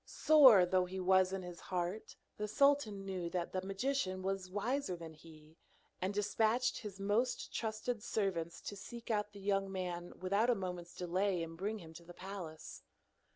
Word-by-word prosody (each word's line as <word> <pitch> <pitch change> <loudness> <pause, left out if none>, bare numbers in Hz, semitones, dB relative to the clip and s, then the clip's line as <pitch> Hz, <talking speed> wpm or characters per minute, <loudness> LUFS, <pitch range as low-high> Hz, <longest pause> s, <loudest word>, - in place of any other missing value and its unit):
Sore 260 -12 +7
though 185 0 +2
he 190 +1 -5
was 185 0 +4
in 190 -1 -3
his 175 -1 -8
heart, 180 +3 -3 0.2
the 210 - -2
sultan 220 -5 +2
knew 185 -3 -3
that 175 -1 -2
the 185 - 0
magician 195 -1 -1
was 190 -1 -2
wiser 210 +2 -1
than 165 -2 -9
he, 155 0 -16 0.4
and 185 +2 0
despatched 220 +4 +1
his 205 -3 -8
most 210 +6 0
trusted 220 +1 -2
servants 175 -7 -2
to 205 - -6
seek 235 +4 -7
out 210 -1 0
the 200 - -11
young 195 0 0
man 180 -2 -4
without 200 +6 +2
a 245 - +4
moment's 180 -3 -5
delay 180 0 0
and 165 0 -7
bring 205 +6 -2
him 165 -5 -11
to 170 +1 -11
the 175 +1 -12
palace. 180 -4 -8
195 Hz, 175 wpm, -35 LUFS, 180-210 Hz, 0.4 s, Sore